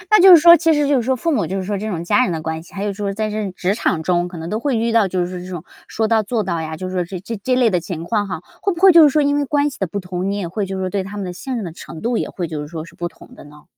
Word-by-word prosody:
诶， 350 - -17
那 425 -2 +5
就 380 - +9
是 - - +4
说 340 +1 +9
其 325 +1 +2
实 295 -1 +2
就 285 - +2
是 250 - +2
说 260 +2 0
父 330 +6 -1
母 225 - +1
就 190 - -3
是 190 - -3
说 205 +1 -2
这 215 +3 -4
种 170 -5 -3
家 255 - +3
人 210 - 0
的 160 - -3
关 160 0 -4
系， - - -18
还 200 +1 -4
有 205 - -1
说 200 0 -3
在 215 +1 -2
这 215 0 -3
种 195 -3 -4
职 190 +3 0
场 170 -7 -1
中 175 -1 +1
可 175 - -9
能 160 +1 -6
都 215 +4 -2
会 265 -3 0
遇 230 +1 0
到 220 -4 +3
就 180 -1 -1
是 180 0 -7
这 185 - -9
种 175 -4 -6 0.2
说 220 - -1
到 220 -1 +2
做 215 +1 -2
到 170 -3 -2
呀， 160 0 -5
就 185 +1 -5
是 185 - -6
说 180 -1 0
这 185 +1 -7
这 220 +5 -6
这 255 -1 +1
类 245 -3 +4
的 180 -2 +1
情 170 -2 -6
况 205 +1 -1
哈， 175 -3 -4 0.2
会 395 - +1
不 340 - -7
会 380 -1 +8
就 335 -1 +8
是 300 - +8
说 300 +2 +2
因 285 0 +2
为 290 - +1
关 290 +1 +1
系 260 - -10
的 190 - 0
不 200 +5 -4
同， 180 +1 -3
你 200 - -2
也 190 - -3
会 200 +4 -3
就 190 0 -5
是 190 - -3
说 - - -1
对 195 0 -2
他 200 +2 -8
们 200 - -4
的 180 - -5
信 255 +7 -5
任 220 - -3
的 170 - -6
程 165 -1 -10
度 235 0 -1
也 - - -3
会 175 -3 -4
就 155 -2 -5
是 150 - -7
说 160 -1 -6
是 - - -15
不 175 0 -4
同 - - -17
的 - - -13
呢？ 150 0 -16
200 Hz, 415 characters per minute, -19 LUFS, 175-245 Hz, 0.2 s, 就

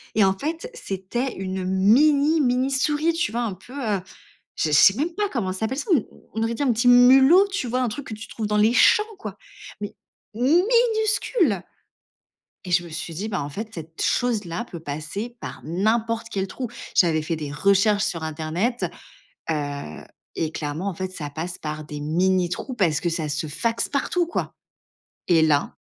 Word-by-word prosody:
Et 210 - +5
en 190 0 +2
fait, 325 - -4
c'était 240 - -3
une 190 0 -4
mini 280 - +4
mini 255 0 +2
souris. 295 +4 +1
Tu 325 -10 -1
vois 240 +1 -1
un 215 -5 -2
peu, 190 +7 -16
heu, 220 -9 -1 0.6
je 160 - 0
je - - -3
sais 170 +6 +7
même 320 +7 -1
pas 415 +1 0
comment 210 - -2
s'appelle 220 +7 -2
ça. 360 - -4 0.4
On 225 0 -1
aurait 230 - 0
dit 260 - -2
un 265 - +3
petit 235 +2 +1
mulot, 265 +10 +7
tu 325 -11 -2
vois? 255 +2 0
Un 250 - +1
truc 270 +5 -7
que - - -6
tu 215 +1 -8
trouves 220 -2 -4
dans 210 0 +1
les 215 +3 +4
champs 420 - +6
quoi, 385 - -7 0.4
mais 205 - -5 0.4
minuscule 410 - +2 1.0
et 180 - -7
je 175 0 +3
me - - -9
suis 165 +1 -6
dit: 200 +7 -4
«Bah, 190 -7 -2
en 140 - -5
fait, 215 +10 -6
cette 160 -1 -9
chose-là 215 -7 0
peut 170 - -7
passer 160 +11 -5
par - - -7
n'importe 220 - 0
quel 195 -1 -2
trou». 245 +6 -5 0.3
J'avais 160 -3 +3
fait 165 +1 -2
des 150 -2 -5
recherches 200 +6 +3
sur 165 -5 -3
internet, 160 +10 -2 0.7
heu, 145 - -4 0.3
et 160 -1 -1
clairement, 155 +5 -4
en - - -4
fait, 185 +2 -5
ça 150 -5 -6
passe 165 +5 -5
par 155 0 -5
des 150 -1 -7
mini 175 +4 +1
trous 255 +9 -4
parce 175 -10 +1
que 175 - 0
ça 165 -2 -2
se 150 +2 -2
faxe 230 +10 -1
partout, 345 +5 0
quoi, - - -3 0.7
et 170 -3 +4
là, 150 -2 +2
205 Hz, 190 wpm, -23 LUFS, 165-255 Hz, 1.0 s, sais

